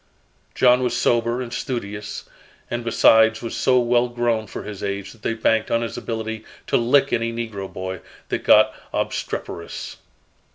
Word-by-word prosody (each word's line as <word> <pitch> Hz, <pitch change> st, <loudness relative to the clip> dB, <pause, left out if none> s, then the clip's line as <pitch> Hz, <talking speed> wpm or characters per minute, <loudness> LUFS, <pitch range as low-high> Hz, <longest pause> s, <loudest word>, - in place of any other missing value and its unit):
John 125 Hz, 0 st, +5 dB
was 125 Hz, -, 0 dB
sober 120 Hz, +1 st, +1 dB
and 120 Hz, -1 st, -8 dB
studious, 105 Hz, -5 st, -5 dB, 0.4 s
and 120 Hz, 0 st, -2 dB
besides 110 Hz, 0 st, +4 dB
was 115 Hz, -, -4 dB
so 130 Hz, -1 st, +3 dB
well 120 Hz, 0 st, +2 dB
grown 120 Hz, -2 st, 0 dB
for -, -, -7 dB
his 105 Hz, -2 st, -7 dB
age 100 Hz, -1 st, -3 dB
that 115 Hz, -, -18 dB
they 115 Hz, -, -1 dB
banked 110 Hz, 0 st, +1 dB
on 115 Hz, 0 st, +1 dB
his 115 Hz, -, -4 dB
ability 110 Hz, -1 st, -4 dB, 0.2 s
to -, -, +2 dB
"lick" 135 Hz, +4 st, +3 dB
any 115 Hz, -1 st, 0 dB
negro 110 Hz, -5 st, -5 dB
boy 95 Hz, 0 st, -5 dB, 0.3 s
that -, -, -2 dB
got -, -, +6 dB, 0.2 s
obstreperous. 85 Hz, -, -4 dB
115 Hz, 160 wpm, -22 LUFS, 110-120 Hz, 0.4 s, got